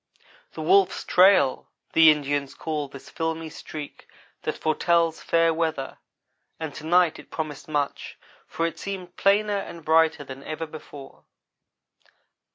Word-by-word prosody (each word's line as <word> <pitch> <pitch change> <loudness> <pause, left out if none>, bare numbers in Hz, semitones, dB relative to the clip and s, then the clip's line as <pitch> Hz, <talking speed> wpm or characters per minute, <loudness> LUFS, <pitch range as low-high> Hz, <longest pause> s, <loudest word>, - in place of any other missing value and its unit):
"The - - -6
wolf's 390 +1 +3
trail," 180 -8 +4 0.2
the 160 -1 +8
Indians 145 -2 0
call 150 -2 -3
this 140 0 -12
filmy 160 -1 -3
streak 150 -1 -9 0.3
that - - -3
foretells 165 +1 +1
fair 165 0 +2
weather, 160 -4 -2 0.6
and 160 -3 -5
to 155 - -8
night 175 -1 +3
it - - -14
promised 155 -3 -5
much, 145 -2 -3 0.3
for 165 - -2
it 165 - -4
seemed 185 -3 -6
plainer 205 +1 +2
and 170 -4 -9
brighter 160 -1 +3
than 135 0 -10
ever 155 +1 -4
before. 150 -3 -12
160 Hz, 135 wpm, -25 LUFS, 150-170 Hz, 0.6 s, the